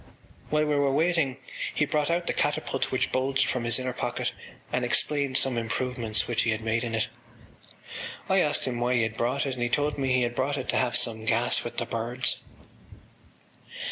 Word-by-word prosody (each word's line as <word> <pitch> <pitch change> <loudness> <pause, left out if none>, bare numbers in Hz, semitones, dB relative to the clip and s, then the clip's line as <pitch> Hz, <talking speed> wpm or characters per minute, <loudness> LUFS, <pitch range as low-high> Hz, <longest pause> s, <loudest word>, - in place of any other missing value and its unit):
While 155 0 +2
we 150 - +1
were 145 -1 +3
waiting 155 -3 +2 0.4
he 150 - +3
brought 150 0 0
out 170 +1 +1
the - - 0
catapult 145 -2 0
which 130 - 0
bulged 135 +1 +2
from 125 -2 -1
his 120 0 +4
inner 130 -1 -2
pocket 120 -1 -2 0.4
and - - +1
explained 140 -3 +2
some 130 -3 +2
improvements 115 -1 -1
which 120 -1 +1
he - - +1
had 110 0 0
made 115 +1 0
in 115 -2 -2
it. 110 +2 +1 1.2
I 190 0 +4
asked 150 -4 +2
him 125 -2 -2
why 125 +1 +2
he 120 - +3
had 110 -1 -2
brought 125 +5 0
it 135 - -1
and 125 - -6
he 120 - +1
told 145 +3 0
me 135 -1 +1
he 125 -1 +3
had 120 0 -1
brought 140 +4 0
it 130 - -4
to - - +2
have 125 -2 +1
some 110 -2 -1
gas 115 +2 +2
with 120 - -6
the - - 0
birds. 120 +3 -1
130 Hz, 205 wpm, -27 LUFS, 120-140 Hz, 1.2 s, his